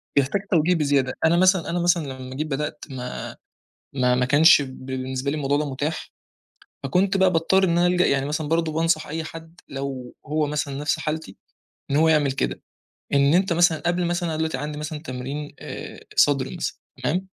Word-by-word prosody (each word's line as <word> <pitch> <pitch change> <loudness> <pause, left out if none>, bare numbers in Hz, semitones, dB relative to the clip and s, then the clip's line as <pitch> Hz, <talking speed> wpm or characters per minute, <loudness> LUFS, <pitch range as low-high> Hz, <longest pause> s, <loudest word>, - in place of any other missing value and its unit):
بيحتاج 140 +8 +2
توجيه 170 +1 +3
بزيادة، 140 -4 +1
أنا 165 +2 +4
مثلًا 185 -1 +3
أنا 175 - -1
مثلًا 170 -5 +1
لمّا 130 0 -8
جيت 155 +3 -2
بدأت 150 +1 -4
ما 125 -2 -6 0.6
ما 125 -2 +2
ما 125 - +2
كانش 145 +3 +6
ب 130 -1 -9
بالنسبة 130 +1 -3
لي - - -2
الموضوع 145 -1 +1
ده 150 -1 -2
مُتاح، 145 +4 -4 0.7
فكُنت 185 +8 +1
بقى 190 -1 +4
باضطر 180 +3 +3
إن 185 - +3
أنا 175 0 +4
ألجأ 180 0 +3
يعني 135 0 +1
مثلًا 150 +1 -2
برضه 165 0 +1
بانصح 165 0 +1
أي 160 +2 -3
حد، 165 +2 -10
لو 135 -2 -5
هو 150 0 0
مثلًا 145 -1 -2
نفس 145 +1 -1
حالتي 155 -9 -4 0.5
إن 140 - +2
هو 160 +2 +4
يعمل 150 -4 +3
كده، 135 - -2 0.5
إن 140 +2 +4
أنت 185 0 +3
مثلًا 170 -1 +4
قبل 175 +1 +1
مثلًا 175 0 -1
أنا 160 - -2
دلوقتي 160 -4 -1
عندي 150 +2 -5
مثلًا 150 0 -5
تمرين 135 +3 -6
آآ، - - -8 0.2
صدر 135 -2 +3
مثلًا، 170 - -3 0.3
تمام؟ 175 +9 0
150 Hz, 190 wpm, -23 LUFS, 135-165 Hz, 0.7 s, كانش